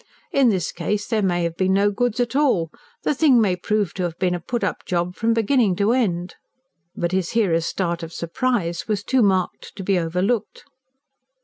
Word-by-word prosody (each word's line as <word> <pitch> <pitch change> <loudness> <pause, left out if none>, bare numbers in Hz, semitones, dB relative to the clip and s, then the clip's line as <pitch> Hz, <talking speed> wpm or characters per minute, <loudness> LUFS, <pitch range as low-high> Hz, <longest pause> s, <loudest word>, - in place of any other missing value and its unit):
In 270 -3 +4
this 185 -6 0
case, 205 +5 -2
there 220 -2 0
may 175 -3 +1
have 170 -1 -2
been 185 +1 +1
no 200 +1 +3
goods 245 +2 -1
at 245 0 -1
all 225 - +2 0.3
the - - +1
thing 280 -4 +4
may 200 -5 +2
prove 205 0 -1
to 190 - -5
have 175 -2 -2
been 180 -1 +1
a 175 - -2
put 240 +7 -3
up - - -2
job 175 0 -1
from 225 0 +1
beginning 225 -3 +2
to 205 +4 +2
end." 180 -8 -1 0.6
But 170 0 -1
his 185 -2 -1
hearer's 170 -8 +2
start 170 -2 -2
of 165 -1 -7
surprise 175 -1 -2
was 205 -2 -1
too 260 +2 +2
marked 190 -4 0
to 195 - -6
be 190 -1 +2
overlooked. 180 +7 -1
195 Hz, 200 wpm, -22 LUFS, 175-230 Hz, 0.6 s, In